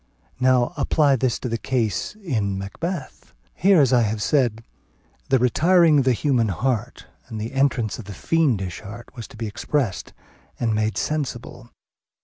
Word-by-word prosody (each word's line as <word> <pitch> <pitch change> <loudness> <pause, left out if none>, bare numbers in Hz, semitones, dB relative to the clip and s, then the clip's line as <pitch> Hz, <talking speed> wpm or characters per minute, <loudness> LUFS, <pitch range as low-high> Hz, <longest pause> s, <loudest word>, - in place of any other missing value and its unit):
Now 130 +3 +3
apply 145 0 +3
this 125 -1 0
to - - -3
the 115 -1 -2
case 115 - -1
in 115 - -2
Macbeth. 140 - -6 0.2
Here, 190 0 +4
as 135 -3 +4
I 125 - +5
have 110 -1 -1
said, 115 -2 +1 0.7
the 135 - +4
retiring 160 +5 +4
of 135 - +1
the 130 - +4
human 120 -1 +1
heart 120 +3 -2 0.2
and 110 -3 -6
the 115 +5 -5
entrance 135 -6 0
of 115 - -8
the 105 - -8
fiendish 115 - 0
heart 115 +3 -10
was 115 -4 -7
to - - -15
be 115 - -4
expressed 105 - -2 0.5
and 115 -2 0
made 110 -2 0
sensible. 125 -1 -4
125 Hz, 160 wpm, -23 LUFS, 110-140 Hz, 0.7 s, I